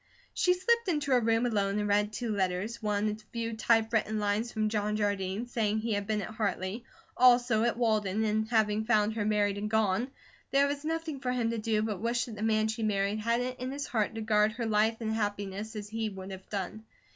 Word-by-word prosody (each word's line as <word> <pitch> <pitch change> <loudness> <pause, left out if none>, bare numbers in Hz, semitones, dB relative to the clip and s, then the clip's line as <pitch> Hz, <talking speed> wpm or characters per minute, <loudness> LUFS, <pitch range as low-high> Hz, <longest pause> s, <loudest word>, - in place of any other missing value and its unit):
She 360 0 +3
slipped 465 +4 +1
into 300 -5 0
her 255 - +6
room 225 +1 +2
alone 200 -4 0
and 210 0 0
read 205 +1 +2
two 220 -1 -3
letters, 190 +4 -1
one 210 0 0
a 210 - -1 0.2
few 230 -1 -3
typewritten 220 -1 +2
lines 210 +3 0
from 215 -1 0
John 210 0 -1
Jardine, 205 0 -1
saying 220 -3 0
he 220 0 -1
had 205 -1 -2
been 215 -2 0
at 215 - -7
Hartley, 210 +1 -2 0.3
also 245 -3 +5
at 235 - 0
Walden, 215 -3 +1
and 220 0 0
having 220 -2 +2
found 215 -2 +2
her 215 -2 -2
married 205 -1 +1
and 210 +1 -3
gone, 220 +2 +1 0.4
there 275 +1 +4
was 285 0 -2
nothing 320 -2 -3
for 255 -2 -2
him 240 -2 0
to 230 - -2
do 215 -1 0
but 210 -4 -2
wish 235 +1 0
that 235 -4 -8
the 210 - -8
man 220 0 +2
she 220 +1 -3
married 205 -1 0
had 230 +2 +1
it 250 0 -4
in 255 +1 -3
his 280 +1 -4
heart 225 -2 -1
to 225 - -4
guard 215 0 +2
her 230 0 -3
life 220 +1 +2
and 220 -1 -1
happiness 205 0 -3
as 210 -1 -6
he 220 0 -2
would 190 -1 -8
have 190 0 -10
done. 205 +2 -4
220 Hz, 225 wpm, -30 LUFS, 210-235 Hz, 0.4 s, her